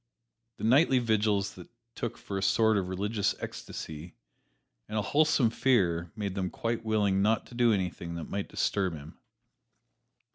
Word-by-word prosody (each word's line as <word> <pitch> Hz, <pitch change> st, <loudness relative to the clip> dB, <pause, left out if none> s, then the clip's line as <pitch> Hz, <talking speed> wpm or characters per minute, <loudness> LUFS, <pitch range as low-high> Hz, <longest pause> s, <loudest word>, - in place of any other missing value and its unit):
His -, -, -4 dB
nightly 130 Hz, +3 st, +5 dB
vigils 105 Hz, -4 st, +1 dB
they 90 Hz, -, -11 dB, 0.3 s
took 120 Hz, -, -4 dB
for 100 Hz, -1 st, -5 dB
a -, -, -4 dB
sort 110 Hz, +3 st, +3 dB
of 95 Hz, -3 st, 0 dB
religious 100 Hz, +3 st, -1 dB
ecstasy, 80 Hz, +2 st, -7 dB, 0.7 s
and 110 Hz, -, -3 dB
a 105 Hz, -, +1 dB
wholesome 145 Hz, -5 st, +3 dB
fear 90 Hz, -10 st, +1 dB
made 100 Hz, -3 st, -3 dB
them 95 Hz, -2 st, -2 dB
quite 115 Hz, +3 st, -3 dB
willing 105 Hz, -3 st, +2 dB
not 110 Hz, +2 st, +2 dB
to -, -, -15 dB
do 120 Hz, -1 st, +3 dB
anything 90 Hz, -4 st, -2 dB
that 85 Hz, -, -4 dB
might 100 Hz, 0 st, -4 dB
disturb 95 Hz, -4 st, 0 dB
him. 75 Hz, +1 st, -11 dB
100 Hz, 155 wpm, -29 LUFS, 95-115 Hz, 0.7 s, nightly